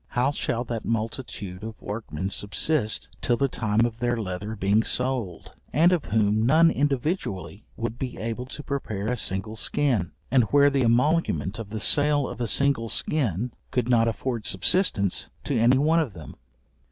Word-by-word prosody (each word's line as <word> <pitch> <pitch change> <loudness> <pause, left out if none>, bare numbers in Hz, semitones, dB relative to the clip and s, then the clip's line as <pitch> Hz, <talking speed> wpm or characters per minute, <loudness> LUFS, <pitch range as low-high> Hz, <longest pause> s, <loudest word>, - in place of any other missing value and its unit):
How 130 +3 +3
shall 120 -4 -2
that 115 -2 -5
multitude 110 -4 -4
of 110 0 -7
workmen 100 -4 -5
subsist 110 +4 0
till 120 -2 +1
the 140 - +2
time 110 -2 +1
of 115 -1 -4
their 120 0 0
leather 100 +1 -4
being 100 +2 +2
sold, 125 -7 -2 0.2
and 170 +4 +4
of 175 -4 0
whom 105 0 +1
none 160 +7 +5
individually 135 - -2
would 115 +1 -4
be 130 -2 -4
able 115 +3 -4
to 145 +2 -7
prepare 110 -8 -3
a 125 - 0
single 105 -1 -1
skin; 115 - 0 0.2
and 125 -3 +4
where 145 +5 +4
the 135 -1 +1
emolument 120 - +1
of 110 -3 -7
the 110 +1 -4
sale 145 +4 +3
of - - -7
a 120 - 0
single 135 -2 +2
skin 120 - 0 0.2
could 125 -2 -1
not 115 -2 +4
afford 115 -1 -3
subsistence 100 - +2
to 140 - -2
any 120 +3 +4
one 155 +4 +3
of 145 -10 -2
them? 80 -4 -10
115 Hz, 170 wpm, -25 LUFS, 105-140 Hz, 0.2 s, none